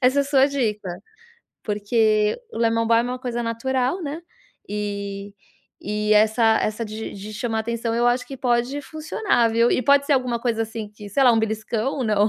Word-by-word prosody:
essa 275 +3 +4
sua 275 -1 +4
dica, 220 -9 -2 0.8
porque 215 - +1
o - - -8
lemon 230 0 +2
balm 230 0 +4
é - - -2
uma 255 - -4
coisa 240 -2 -3
natural, 255 +7 -1
né, 305 +3 -5 0.5
e 200 -1 -4 0.5
e 210 +1 -1
essa 220 +1 +4
essa 215 +2 -2
de 215 +1 -6
de 205 +2 -8
chamar 225 +1 -2
a - - +1
atenção, 230 0 -2
eu 240 +1 +2
acho 245 +1 +2
que 270 - -8
pode 245 +3 0
funcionar, 310 - 0
viu, 230 +1 +3
e 255 - +1
pode 280 +2 +4
ser 290 - +2
alguma 250 -2 0
coisa 230 -2 0
assim, 225 -1 -6
que 210 0 -11
sei 270 +7 +2
lá, 245 - +7
um 225 - +3
beliscão 220 +3 -2
ou 255 - -1
não? 210 -1 +3
230 Hz, 195 wpm, -23 LUFS, 215-255 Hz, 0.8 s, lá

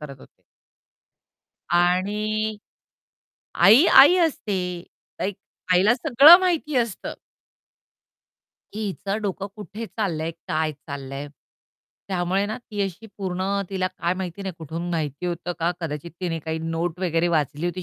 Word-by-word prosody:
करत 145 -2 -9
होते. - - -19 1.3
आणि 210 +5 +1 1.0
आई, 230 - +7
आई 295 +3 +8
असते, 250 - 0 0.6
लाइक 195 0 -2 0.4
आईला 195 +6 +5
सगळं 295 +4 +8
माहिती 335 -5 0
असतं. 230 -5 -2 1.6
की 215 +1 -4
हिचं 200 +2 -3
डोकं 195 -1 -3
कुठे 210 +2 -7
चाललंय? 165 -8 -3 0.2
काय 155 0 0
चाललंय? 140 -1 -7 0.8
त्यामुळे 185 +1 0
ना 215 - -4
ती 215 -4 -7
अशी 195 +3 -5
पूर्ण 185 -1 -3 0.3
तिला 190 -1 -1
काय 180 -1 -2
माहिती 185 +1 -6
नाही 190 - -4
कुठून 165 +2 -5
माहिती 155 0 -3
होतं 175 0 -3
का? 170 +1 +1
कदाचित 160 0 -5
तिने 170 -3 -2
काही 160 +1 -4
नोट 165 +1 -3
वगैरे 170 -2 +1
वाचली 155 0 0
होती 180 +1 -4
185 Hz, 130 wpm, -23 LUFS, 165-210 Hz, 1.6 s, आई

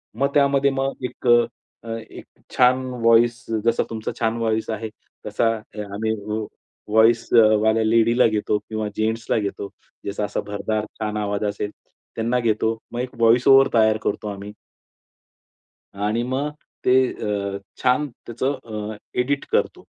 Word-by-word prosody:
मग 140 +1 0
त्यामध्ये 140 -1 +3
मग 135 0 -3
एक 125 - -8 0.6
अ, - - -12 0.2
एक - - -11 0.3
छान 130 +1 +4 0.2
व्हॉईस 115 +1 +4 0.2
जसा 115 0 +3
तुमचा 110 -1 -4
छान 115 -1 0
व्हॉईस 110 -1 -1
आहे 110 0 -3 0.4
तसा 105 +2 +1
अ, 105 0 -12
आम्ही 110 +2 -1 0.8
व्हॉईसवाल्या 110 0 +4
लेडीला 115 +2 +4
घेतो 105 -1 0
किंवा 110 0 -4
जेन्ट्सला 110 +1 0
घेतो. 100 -1 -4 0.3
ज्याचा 100 +1 -2
असा 105 - -3
भरदार 105 +1 -2
छान 105 -1 -2
आवाज 105 0 -2
असेल 105 0 -4 0.4
त्यांना 115 +2 0
घेतो. 110 -1 0
मग 120 - -4
एक 125 0 -6
व्हॉईस 115 +2 +4
ओव्हर 135 0 +8
तयार 110 -1 +4
करतो 105 - -2
आम्ही 100 +1 -7 1.4
आणि 105 +4 -1
मग 130 +4 -1 0.4
ते 125 - +5 0.2
अ, 100 -1 -3 0.3
छान 130 +4 +3 0.2
त्याचं 130 +4 -2 0.3
अ, - - -7 0.2
एडिट 140 +3 0
करतो. - - 0
115 Hz, 140 wpm, -22 LUFS, 105-125 Hz, 1.4 s, ओव्हर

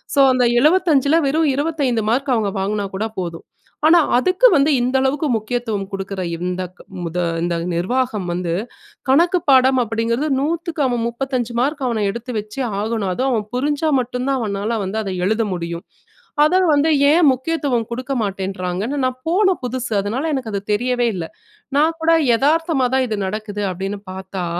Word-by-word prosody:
So, - - +3
அந்த 250 -1 +2 0.2
75ல 310 -3 +3
வெறும் 310 +1 +2
25 285 -6 0
mark 265 +1 +1
அவங்க 210 -3 0
வாங்குனா 205 +1 -1
கூட 215 - -1
போதும். 170 -2 -6 0.4
ஆனா 340 +1 +7 0.2
அதுக்கு 370 - +4
வந்து 285 +2 +3
இந்த 255 +2 0
அளவுக்கு 275 +3 0
முக்கியத்துவம் 220 -3 -2
குடுக்குற 195 0 -4
இந்தக் 180 +1 -4 0.3
முத 170 +1 -4 0.3
இந்த 175 -1 0 0.2
நிர்வாகம் 210 +2 -1
வந்து, 175 -1 -2 0.6
கணக்குப் 340 +5 +3
பாடம் 260 0 +5
அப்டிங்கிறது 230 +5 -1
100க்கு 330 +2 -2
அவன் 240 -2 0
35 245 -1 -3
மார்க் 280 +2 -1
அவன 225 -3 -1
எடுத்து 235 +4 -5
வச்சு 215 +6 -8 0.2
ஆகணும். 215 -2 -1
அதுவும் 260 +6 0
அவன் 215 -3 0
புரிஞ்சா 295 +4 0
மட்டும்தான் 250 +2 -1
அவனால 210 +2 -2
வந்து 195 +3 -3
அத 195 -2 -4
எழுத 220 +2 +1
முடியும். 170 -1 -5 0.6
அத 305 - +2 0.2
வந்து 300 +2 +3 0.2
ஏன் 330 -1 +5
முக்கியத்துவம் 260 -4 -1
குடுக்க 255 +3 -3
மாட்டேன்றாங்கன்னு 195 +5 -3
நான் 255 0 -2
போன 380 +1 +3
புதுசு, 250 -1 -3
அதனால 255 +11 -2
எனக்கு 255 -6 -3
அது 200 - -2
தெரியவே 245 +2 +1
இல்ல. 165 -2 -4 0.5
நான் 320 +2 +2
கூட 330 - +3 0.3
எதார்த்தமா 305 -1 +2
தான் 265 - +2
இது 215 - -2
நடக்குது 205 0 -4
அப்டின்னு 195 +2 -5
பாத்தா, 190 -1 -5
245 Hz, 155 wpm, -19 LUFS, 205-280 Hz, 0.6 s, ஆனா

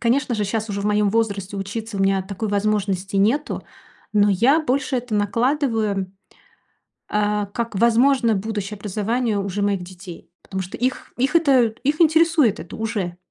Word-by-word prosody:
Конечно 250 +1 +1
же, 215 - -1
щас 220 +2 -2
уже 200 0 -3
в - - -6
моём 210 0 +2
возрасте 200 -3 -1
учиться 205 +2 -5
у - - -2
меня 195 0 +2
такой 200 +3 -5
возможности 200 -2 -1
нету, 230 +10 +1 0.5
но 205 -1 +4
я 235 - +4
больше 275 -2 0
это 245 -2 -3
накладываю, 215 -2 0 1.0
э, 210 0 0
как 235 -2 -3
возможно 235 +2 +3
будущее 210 0 -4
образование 210 +3 -1
уже 200 0 -3
моих 200 -2 0
детей, 180 -1 -11
потому 190 0 -4
что 185 +1 -7
их 255 +2 -2
их 265 +6 0
это, 275 -6 +4 0.2
их 300 +4 +1
интересует 320 - +4
это 170 - -9
уже. 205 -6 -3
210 Hz, 160 wpm, -22 LUFS, 200-245 Hz, 1.0 s, но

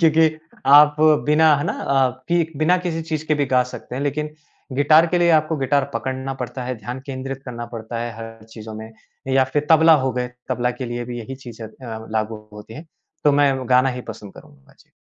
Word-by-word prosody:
क्योंकि 160 -1 +4 0.4
आप 150 +1 +7
बिना, 155 0 +4
है 145 - -2
ना? - - -1
अ, 135 -2 +1 0.2
कि 170 -2 +1
बिना 155 +4 +3
किसी 165 -1 -2
चीज़ 155 -1 -4
के 155 - +2
भी 145 -2 0
गा 125 -1 +3
सकते - - -8
हैं, 135 - -3
लेकिन 150 +1 -2 0.5
गिटार 155 +4 +5
के 175 +1 0
लिए 170 0 +4
आपको 155 +1 -2
गिटार 140 0 +1
पकड़ना 130 0 -3
पड़ता 125 +1 -5
है, 125 +1 -3
ध्यान 120 +5 -6
केंद्रित 135 0 -6
करना 120 -2 -6
पड़ता 115 +1 -6
है 120 0 -4
हर 115 -1 -10
चीज़ों 110 -1 -9
में, 110 +1 -9 0.4
या 130 0 +3
फिर 145 +3 -2
तबला 160 0 +7
हो 130 -2 0
गए, 125 0 -2 0.2
तबला 125 -1 0
के 130 +1 -6
लिए 120 0 -4
भी 120 0 -6
यही 130 +4 -7
चीज़ें 115 -2 -8
अ, 110 -1 -9
लागू 110 -1 -3
होती 105 +1 -11
हैं। 160 +5 -10 0.4
तो 145 - +5
मैं 140 -1 +3
गाना 130 +1 +4
ही 125 -1 -4
पसंद 100 -2 -10
करूँगा। 70 -1 -17
जी। - - -25
130 Hz, 215 wpm, -21 LUFS, 120-150 Hz, 0.5 s, आप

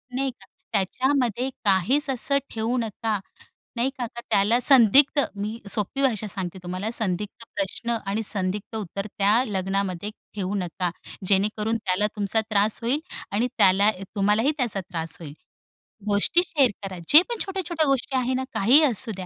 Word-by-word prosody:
नाही 270 0 -1
का - - -20 0.3
त्याच्यामध्ये 250 +4 0 0.2
काहीच 225 - +2
असं 270 +2 +4
ठेवू 230 +3 -1
नका. 220 -2 -2 0.6
नाही 250 +3 +1
का, 240 - -2
क - - -4
त्याला 210 +5 +3
संदिग्ध 270 +3 +6 0.2
मी 215 +3 -4
सोपी 220 +6 0
भाषा 220 -5 +1
सांगते 190 -2 -5
तुम्हाला 185 +5 -4
संदिग्ध 210 +2 -3
प्रश्न 235 -6 -2
आणि 220 +3 -1
संदिग्ध 200 +2 -2
उत्तर 200 0 -5
त्या 210 +5 +2
लग्नामध्ये 195 -1 -2 0.2
ठेवू 200 0 -3
नका. 180 -1 -2 0.4
जेणेकरून 210 +3 +1
त्याला 200 0 0
तुमचा 210 +2 +1
त्रास 210 +1 +2
होईल 260 +6 0 0.3
आणि 235 +5 +1
त्याला 195 +3 +5 0.3
तुम्हालाही 210 +7 +2
त्याचा 225 -6 0
त्रास 165 -3 -4
होईल. 145 -3 -8 0.8
गोष्टी 205 +12 +3
शेअर 275 -6 +2
करा 190 -2 -6
जे 310 +3 +9
पण 475 - -2
छोट्या-छोट्या 345 -5 -1
गोष्टी 270 0 0
आहे 255 0 0
ना 260 +1 -1
काहीही 260 +10 +5
असू 240 -3 +3
द्या 185 -1 -6
215 Hz, 155 wpm, -24 LUFS, 195-255 Hz, 0.8 s, जे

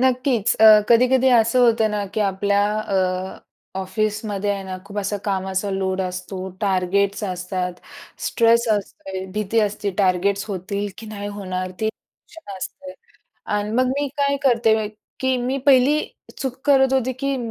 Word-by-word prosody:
नक्कीच. 255 -3 +2
अ, 220 - +8 0.2
कधी-कधी 255 +2 +4
असं 230 +3 +3
होतं 225 -2 +3
ना, 210 -1 -2
की 220 - 0
आपल्या 200 0 +1 0.2
अ, 200 -2 -1 0.8
ऑफिसमध्ये 210 +1 -2
आहे 200 -1 -2
ना 185 -1 -5
खूप 205 +1 -7
असा 205 +1 -1
कामाचा 190 0 -1
लोड 190 -1 -1
असतो, 185 +1 -5
टार्गेट्स 200 +1 +1
असतात, 180 -1 -3 0.5
स्ट्रेस 235 0 +3
असतो, 195 -1 -4 0.2
भीती 215 +2 -1
असते, 205 -1 -1
टार्गेट्स 195 +1 +2
होतील 200 +1 -3
की 220 - -9
नाही 205 -1 -6
होणार 185 -2 -4
ते 220 - +1
टेन्शन 220 - -12
असते. 280 +8 -8 0.6
आणि 205 0 -2
मग 255 +1 +3
मी 285 0 -1
काय 280 0 +2
करते, 230 -4 +3 0.5
की 260 0 +1
मी 260 +2 -1
पहिली 275 +2 +5 0.4
चूक 265 -2 -3
करत 265 -2 +4
होती 260 -1 +1
की 275 0 0
205 Hz, 145 wpm, -21 LUFS, 195-245 Hz, 0.8 s, अ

